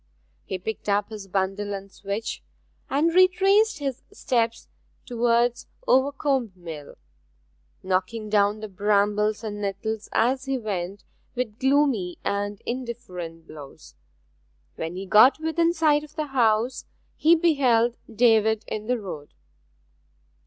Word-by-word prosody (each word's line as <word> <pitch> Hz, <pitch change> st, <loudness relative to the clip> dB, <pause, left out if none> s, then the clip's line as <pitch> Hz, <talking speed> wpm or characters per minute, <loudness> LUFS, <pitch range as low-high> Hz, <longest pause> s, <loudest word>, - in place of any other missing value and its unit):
He 190 Hz, -, -3 dB
picked 210 Hz, +3 st, -5 dB
up 205 Hz, +1 st, +1 dB
his 210 Hz, -3 st, -8 dB
bundle 195 Hz, +2 st, -1 dB
and 195 Hz, 0 st, -9 dB
switch, 200 Hz, +4 st, -5 dB, 0.5 s
and 315 Hz, +5 st, +2 dB
retraced 390 Hz, +4 st, +4 dB
his 275 Hz, -3 st, -4 dB
steps 235 Hz, -, -1 dB, 0.4 s
towards 240 Hz, 0 st, +1 dB, 0.2 s
Overcombe 265 Hz, -3 st, +2 dB
Mill, 160 Hz, -5 st, -9 dB, 0.9 s
knocking 190 Hz, +4 st, -1 dB
down 210 Hz, 0 st, +2 dB
the 215 Hz, -, -5 dB
brambles 210 Hz, +2 st, +1 dB
and 205 Hz, -1 st, -5 dB
nettles 210 Hz, +2 st, -3 dB
as 260 Hz, +3 st, +1 dB
he 270 Hz, 0 st, -1 dB
went 200 Hz, -4 st, -4 dB, 0.3 s
with 240 Hz, -3 st, -3 dB
gloomy 265 Hz, -10 st, +2 dB
and 205 Hz, 0 st, -2 dB
indifferent 185 Hz, -10 st, -6 dB
blows. 145 Hz, -3 st, -12 dB, 0.8 s
When 165 Hz, +2 st, -5 dB
he 190 Hz, +1 st, -5 dB
got 215 Hz, +9 st, +6 dB
within 330 Hz, +1 st, +1 dB
sight 310 Hz, -3 st, +2 dB
of 300 Hz, 0 st, -14 dB
the 310 Hz, -1 st, -2 dB
house 235 Hz, 0 st, +2 dB, 0.3 s
he 325 Hz, +2 st, +5 dB
beheld 255 Hz, -8 st, +3 dB, 0.2 s
David 220 Hz, -1 st, +3 dB
in 215 Hz, 0 st, -5 dB
the 250 Hz, 0 st, +1 dB
road. 180 Hz, -9 st, -8 dB
220 Hz, 125 wpm, -25 LUFS, 200-265 Hz, 0.9 s, got